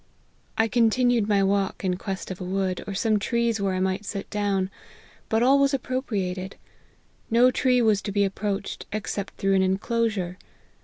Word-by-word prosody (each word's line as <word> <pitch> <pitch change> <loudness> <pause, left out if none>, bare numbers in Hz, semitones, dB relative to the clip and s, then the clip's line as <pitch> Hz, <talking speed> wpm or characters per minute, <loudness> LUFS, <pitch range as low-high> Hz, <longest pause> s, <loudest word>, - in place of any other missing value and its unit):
" - - -38
I 225 - +3
continued 235 0 +3
my 200 -1 +3
walk 195 0 0
in 180 -1 +1
quest 190 0 -5
of 185 - -7
a - - -3
wood, 185 0 -1
or 200 - -4
some 215 +1 +2
trees 235 0 0
where 195 -1 0
I - - -1
might 190 +2 0
sit 200 -1 -5
down; 200 -2 0 0.6
but 220 +1 +2
all 270 +3 +5
was 275 0 +3
appropriated: 195 -8 -3 0.7
no 240 +3 +5
tree 250 -1 +2
was 215 -3 +3
to 205 - -4
be 200 0 +2
approached 195 0 -3
except 200 -1 -4
through 195 0 +1
an 190 - +4
enclosure. 190 -1 0
200 Hz, 175 wpm, -25 LUFS, 190-230 Hz, 0.7 s, all